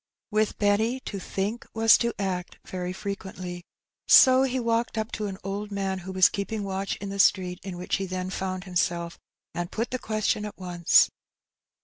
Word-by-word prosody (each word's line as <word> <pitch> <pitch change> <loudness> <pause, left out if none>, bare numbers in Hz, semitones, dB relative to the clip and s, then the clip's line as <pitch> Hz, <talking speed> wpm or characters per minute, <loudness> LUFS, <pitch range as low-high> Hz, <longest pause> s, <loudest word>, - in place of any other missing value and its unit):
With 215 0 +1
Benny 220 +5 +2
to 200 - -5
think 200 +5 -3
was 225 0 +7
to 235 0 +1
act 185 -3 -3
very 180 -1 -4
frequently; 185 -2 -6 0.5
so 260 -1 +8
he 260 -1 +1
walked 230 0 0
up 220 0 -2
to 210 -1 -3
an 190 -1 -6
old 200 +2 -4
man 195 -1 -2
who 190 +1 -7
was 185 -1 +6
keeping 205 +1 -3
watch 195 0 -2
in 200 - -7
the 200 0 -5
street 185 -2 +3
in 190 -3 -7
which 180 - -1
he 195 -1 -3
then 185 0 -4
found 185 -1 -3
himself, 170 -2 -1 0.3
and 175 0 -3
put 230 +2 -3
the 255 - -2
question 215 -1 -1
at 210 - -7
once. 175 -2 +4
195 Hz, 180 wpm, -26 LUFS, 185-215 Hz, 0.5 s, so